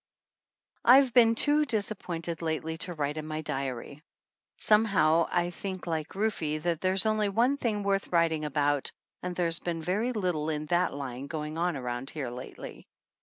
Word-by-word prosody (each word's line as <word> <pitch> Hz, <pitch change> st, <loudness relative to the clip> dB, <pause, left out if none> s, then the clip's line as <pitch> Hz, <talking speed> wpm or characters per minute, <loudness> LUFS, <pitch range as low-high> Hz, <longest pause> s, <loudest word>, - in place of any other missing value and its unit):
I've 255 Hz, 0 st, +6 dB
been 230 Hz, -2 st, +6 dB
too 295 Hz, +5 st, +4 dB
disappointed 185 Hz, -, -3 dB
lately 160 Hz, 0 st, -2 dB
to 175 Hz, -1 st, -2 dB
write 150 Hz, 0 st, -2 dB
in 155 Hz, 0 st, -5 dB
my 155 Hz, 0 st, -3 dB
diary. 135 Hz, -1 st, -4 dB, 0.6 s
Somehow, 185 Hz, -7 st, +3 dB
I 175 Hz, 0 st, +1 dB
think 185 Hz, 0 st, -6 dB
like 160 Hz, -1 st, -3 dB
Rufe, 215 Hz, +2 st, 0 dB, 0.2 s
that 170 Hz, -2 st, 0 dB
there's 190 Hz, +2 st, +2 dB
only 215 Hz, -1 st, +2 dB
one 235 Hz, +7 st, +2 dB
thing 215 Hz, -6 st, -1 dB
worth 195 Hz, 0 st, 0 dB
writing 165 Hz, -3 st, +1 dB
about, 145 Hz, -1 st, +1 dB, 0.3 s
and 180 Hz, 0 st, -4 dB
there's 170 Hz, -2 st, +1 dB
been 165 Hz, -2 st, -4 dB
very 210 Hz, +9 st, 0 dB
little 180 Hz, -9 st, -1 dB
in 155 Hz, -1 st, -2 dB
that 175 Hz, -1 st, +1 dB
line 135 Hz, -1 st, -5 dB
going 155 Hz, 0 st, -4 dB
on 170 Hz, -1 st, 0 dB
around 125 Hz, +1 st, -4 dB
here 135 Hz, -6 st, -4 dB
lately. 125 Hz, +1 st, -9 dB
170 Hz, 165 wpm, -29 LUFS, 150-200 Hz, 0.6 s, I've